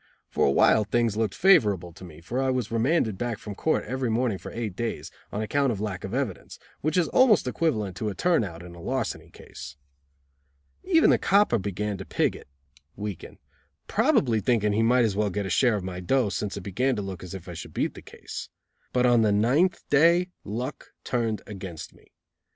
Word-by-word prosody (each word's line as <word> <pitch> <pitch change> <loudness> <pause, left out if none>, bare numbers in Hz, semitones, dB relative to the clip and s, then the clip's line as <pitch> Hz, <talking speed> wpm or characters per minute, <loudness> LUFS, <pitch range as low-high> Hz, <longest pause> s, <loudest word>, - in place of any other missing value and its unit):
For - - +2
a - - +3
while 105 +9 +4
things 115 0 0
looked 110 -3 -1
favorable 100 - +3
to 90 - -13
me, 80 -3 -11
for 120 +10 -2
I 135 - +1
was 125 -4 -1
remanded 115 - +1
back 120 -2 -2
from 105 - -7
court 155 +10 0
every 130 +2 -2
morning 115 -3 0
for - - -9
eight 110 -5 -4
days, 115 +2 -4 0.2
on 105 - -2
account 140 +4 +1
of 105 - -3
lack 100 -3 -4
of 95 - -5
evidence, 125 -6 -3 0.2
which 155 +4 -1
is 175 -3 +3
almost 230 - +4
equivalent 110 - -1
to 110 +3 -2
a 100 - -5
turn 170 - +2
out 85 -4 -7
in 90 0 -10
a 85 - -12
larceny 130 +4 -3
case. 70 - -11 1.1
Even 335 -4 +4
the - - +3
copper 200 - +3
began 100 +1 -3
to - - -5
pig - - 0
it - - -12 0.5
(weaken), 105 -3 -7 0.5
probably 115 -5 +2
thinking 105 -3 +2
he 110 - +2
might 120 +1 +4
as 105 -3 -1
well 105 0 +1
get 100 +1 -3
a 95 - -4
share 120 +2 +3
of 100 - -3
my 90 -1 -5
"dough," 115 +5 +1
since 100 0 -3
it - - -5
began 120 +8 0
to 105 - -3
look 95 -3 -7
as 90 +1 -7
if 95 -1 -9
I 90 - -6
should 80 - -9
beat - - 0
the - - -11
case. - - -9 0.4
But 125 0 +3
on 120 -2 +5
the 110 -2 +3
ninth 130 - +2
day 170 +5 +4
luck 120 +7 -6
turned 115 -4 -1
against 90 -5 -8
me. - - -23
110 Hz, 210 wpm, -26 LUFS, 95-130 Hz, 1.1 s, on